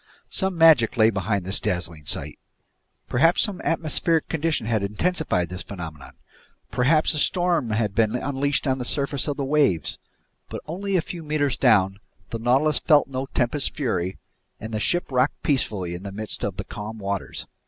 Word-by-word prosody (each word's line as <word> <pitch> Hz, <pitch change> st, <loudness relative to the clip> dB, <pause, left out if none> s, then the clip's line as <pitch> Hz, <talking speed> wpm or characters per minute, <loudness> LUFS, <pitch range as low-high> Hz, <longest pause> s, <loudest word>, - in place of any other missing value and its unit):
Some 190 Hz, -2 st, 0 dB
magic 150 Hz, -7 st, +5 dB
lay 110 Hz, 0 st, +5 dB
behind 100 Hz, -1 st, -1 dB
this 95 Hz, +2 st, +1 dB
dazzling 85 Hz, -4 st, -2 dB
sight! -, -, -2 dB, 0.7 s
Perhaps 165 Hz, +8 st, +3 dB
some 200 Hz, -4 st, -3 dB
atmospheric 165 Hz, 0 st, +1 dB
condition 165 Hz, -5 st, -1 dB
had 110 Hz, -2 st, 0 dB
intensified 105 Hz, -, 0 dB
this 90 Hz, 0 st, -5 dB
phenomenon? 80 Hz, -6 st, -8 dB, 0.6 s
Perhaps 155 Hz, +7 st, +3 dB
a 150 Hz, -, -1 dB
storm 175 Hz, -5 st, +1 dB
had 110 Hz, -2 st, 0 dB
been 110 Hz, +2 st, +2 dB
unleashed 140 Hz, +2 st, -1 dB
on 130 Hz, -1 st, 0 dB
the -, -, -2 dB
surface 140 Hz, +2 st, 0 dB
of 145 Hz, -, -2 dB
the 140 Hz, -, -2 dB
waves? 135 Hz, -, +1 dB, 0.5 s
But -, -, -6 dB
only 195 Hz, +5 st, -3 dB
a 180 Hz, -, +3 dB
few 175 Hz, -, -7 dB
meters 150 Hz, -4 st, 0 dB
down, 95 Hz, -6 st, +3 dB, 0.3 s
the 115 Hz, -, -3 dB
Nautilus 135 Hz, +6 st, +2 dB
felt 150 Hz, -3 st, +4 dB
no 130 Hz, 0 st, -3 dB
tempest's 135 Hz, +3 st, 0 dB
fury, 95 Hz, -, -2 dB, 0.4 s
and 110 Hz, +1 st, -7 dB
the 110 Hz, -, -1 dB
ship 175 Hz, +6 st, 0 dB
rocked 130 Hz, +2 st, +1 dB
peacefully 100 Hz, -, 0 dB
in 85 Hz, -, -6 dB
the 100 Hz, 0 st, -7 dB
midst 105 Hz, +2 st, -6 dB
of -, -, -2 dB
the -, -, -3 dB
calm 110 Hz, +2 st, -7 dB
waters. 100 Hz, -2 st, -4 dB
125 Hz, 175 wpm, -24 LUFS, 100-155 Hz, 0.7 s, magic